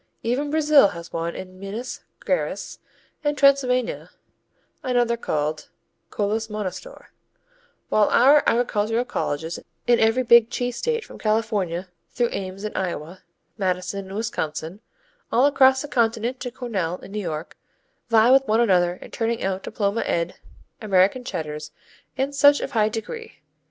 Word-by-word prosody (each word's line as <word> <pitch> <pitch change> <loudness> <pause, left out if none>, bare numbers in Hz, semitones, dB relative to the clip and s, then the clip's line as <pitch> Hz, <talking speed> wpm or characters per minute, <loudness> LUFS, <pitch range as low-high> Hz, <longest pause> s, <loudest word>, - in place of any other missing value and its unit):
Even 255 +6 -1
Brazil 300 -5 +5
has 170 -3 -9
one 165 +1 -3
in 185 0 -9
Minas 210 +6 -6 0.2
Geraes - - -2 0.4
and 295 0 0
Transylvania 265 -3 +2 0.7
another 245 -2 +1
called 155 -8 -3 0.4
Kolos 215 +2 -1
Monostor, 210 - -6 0.8
while 210 -1 +3
our 280 +4 +6
agricultural 230 0 +1
colleges 160 -8 -3 0.3
in 240 -1 +4
every 225 +3 +3
big 235 -1 +6
cheese 245 -1 -3
state 465 -1 -1
from - - -12
California 210 -5 -1 0.2
through 240 -1 0
Ames 190 +1 -5
in 215 - -5
Iowa, 175 -1 -4 0.4
Madison 190 +1 -2
in 190 - -8
Wisconsin, 170 -4 -4 0.5
all 245 +4 +4
across 265 -1 +4
the - - -6
continent 235 0 0
to 250 - -4
Cornell 210 -9 -3
in 195 - -13
New 210 +1 -3
York, 160 -4 -5 0.5
vie 225 +1 +5
with 270 0 +5
one 220 +2 +3
another 180 -6 +3
in - - -13
turning 230 0 -2
out 190 0 -1
diploma 205 +1 -1
ed 170 +1 -1 0.5
American 200 +4 +2
Cheddars 155 -8 -5 0.5
and 270 +2 -1
such 285 +1 +6
of - - -4
high 215 -2 +2
degree. 450 - -7
220 Hz, 140 wpm, -23 LUFS, 185-250 Hz, 0.8 s, our